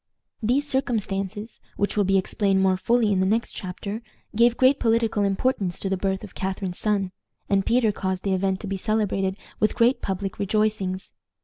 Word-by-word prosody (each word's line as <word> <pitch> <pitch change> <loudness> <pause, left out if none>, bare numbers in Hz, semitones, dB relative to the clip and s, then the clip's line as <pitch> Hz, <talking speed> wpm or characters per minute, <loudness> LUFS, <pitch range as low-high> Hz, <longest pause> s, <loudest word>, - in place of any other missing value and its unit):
These 255 +6 +1
circumstances, 210 -5 -2 0.2
which 205 - 0
will 205 - +3
be 195 +1 +3
explained 195 +1 +1
more 190 -1 +4
fully 230 +3 +2
in 195 - +2
the 190 - +3
next 225 +4 +1
chapter, 200 +4 -5 0.3
gave 235 +2 +4
great 265 +2 +4
political 225 -2 +2
importance 195 -2 0
to 195 - -2
the 190 - +1
birth 190 +1 -1
of 205 - -10
Catharine's 190 -1 -3
son, 200 -3 0 0.4
and 195 -1 +1
Peter 235 -2 +3
caused 190 -2 -3
the 195 - +1
event 190 0 0
to 205 - -5
be 195 0 -2
celebrated 195 -2 0 0.2
with 215 - +2
great 240 +2 +3
public 195 0 -3
rejoicings. 200 -2 0
200 Hz, 180 wpm, -24 LUFS, 190-225 Hz, 0.4 s, more